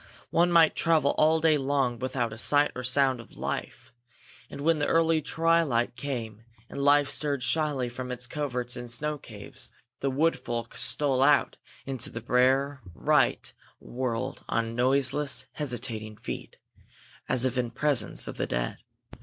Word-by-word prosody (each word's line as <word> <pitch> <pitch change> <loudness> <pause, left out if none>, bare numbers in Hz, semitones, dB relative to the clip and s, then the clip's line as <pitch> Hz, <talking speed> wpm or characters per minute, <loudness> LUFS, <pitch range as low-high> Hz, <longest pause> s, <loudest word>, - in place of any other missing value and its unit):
One 175 +1 +3
might 165 -2 +5
travel 160 -4 +3
all 160 +1 +4
day 155 -2 +3
long 135 -3 0
without 125 -3 -2
a - - -9
sight 145 +4 +3
or 125 - -4
sound 130 0 +2
of 115 - -14
life; - - -5 0.6
and - - -8
when 160 +1 +2
the 145 - 0
early 165 -1 +3
twilight 160 -9 +1
came 115 -6 -5 0.3
and 140 - -6
life 145 0 +5
stirred 145 -4 -1
shyly 135 0 0
from 125 +1 -6
its 125 0 -5
coverts 125 -3 -3
and 120 -1 -7
snow 150 +5 -3
caves, 105 -5 -7 0.3
the 135 - 0
Wood 155 +5 +1
Folk 115 -1 -5
stole 135 -3 +3
out 145 +1 +3 0.3
into 130 -4 -3
the 115 - -6
bare 130 +4 +2
white - - +1 0.3
world 120 -2 -4
on 115 -1 -1
noiseless, 135 +3 +2
hesitating 115 -6 -5
feet, - - -7 0.7
as 125 0 +3
if 130 -1 0
in 125 -2 0
presence 135 -6 +1
of - - -7
the - - -1
dead. - - -2
135 Hz, 155 wpm, -27 LUFS, 120-150 Hz, 0.7 s, might